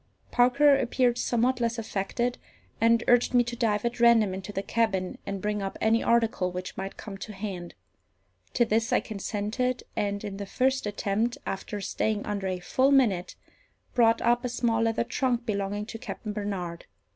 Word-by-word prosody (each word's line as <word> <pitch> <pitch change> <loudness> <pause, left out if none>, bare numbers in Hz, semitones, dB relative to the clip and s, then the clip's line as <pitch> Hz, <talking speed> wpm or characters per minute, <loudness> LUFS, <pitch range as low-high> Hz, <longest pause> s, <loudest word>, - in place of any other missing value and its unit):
Parker 275 +4 +5
appeared 245 -2 +1
somewhat 250 +2 +1
less 235 0 0
affected, 225 +3 -2 0.4
and 230 0 +4
urged 245 +1 +4
me 245 - +6
to 240 0 -5
dive 220 -2 0
at 235 +1 -2
random 230 -4 +5
into 190 +2 -6
the 195 -1 -3
cabin, 195 -5 0
and 195 -1 -4
bring 210 0 -1
up 195 0 -4
any 225 +1 +3
article 225 -6 +2
which 180 +1 -6
might 195 0 -6
come 195 -3 -8
to 215 - -7
hand. 190 -4 -6 0.8
To 240 - +4
this 225 +1 +1
I - - +4
consented, 220 +4 -2
and, 200 -1 -1
in 200 -2 -5
the 200 -1 -6
first 260 +2 +1
attempt, 210 +3 -1
after 205 +2 -4
staying 210 +1 -1
under 200 -2 -2
a 185 -1 -1
full 260 +9 +2
minute, 215 -10 +2 0.6
brought 230 -2 +4
up 240 +1 +3
a 250 - -1
small 235 -2 0
leather 225 0 +1
trunk 245 -1 -1
belonging 205 0 -2
to 225 +1 -8
Captain 215 -3 -6
Barnard. 190 -5 -4
220 Hz, 175 wpm, -27 LUFS, 200-240 Hz, 0.8 s, me